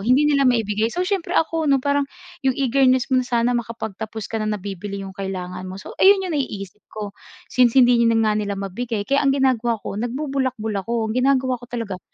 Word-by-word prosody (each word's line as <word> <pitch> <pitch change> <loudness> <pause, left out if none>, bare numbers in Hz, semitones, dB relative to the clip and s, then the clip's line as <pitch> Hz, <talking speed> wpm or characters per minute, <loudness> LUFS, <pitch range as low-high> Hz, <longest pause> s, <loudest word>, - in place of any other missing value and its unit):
hindi 255 +8 +3
nila 280 -3 +4
maibigay. 220 -2 +1
So 355 +10 -2
siyempre 385 -3 -1
ako 320 -1 +1
ano, 275 - +5
parang 280 +1 0 0.3
yung 265 -2 +1
eagerness 260 -1 +3
mo 255 - +5
na 250 - -5
sana 240 0 +2
makapagtapos 220 -2 -4
ka, 225 - -1
na 215 - -1
nabibili 200 0 -6
yung 190 - -8
kailangan 185 -2 -5
mo, 185 - -7
so 190 - -9
ayon 385 0 +6
'yong 360 - -3
naiisip 210 - -4
ko. 210 -2 -6 0.4
Since 250 -1 +4
hindi 245 -2 +6
nga 225 -1 +3
nila 205 -1 -2
mabigay 205 +2 -3
kaya 275 +4 +2
ang 275 -1 +2
ginagawa 240 -3 +2
ko - - -4
nagbubulakbol 255 -3 -2
ako. 225 0 -2
Ang 255 - +1
ginagawa 260 -2 +2
ko 245 - -13
talaga 220 -6 -4
235 Hz, 200 wpm, -22 LUFS, 210-270 Hz, 0.4 s, ayon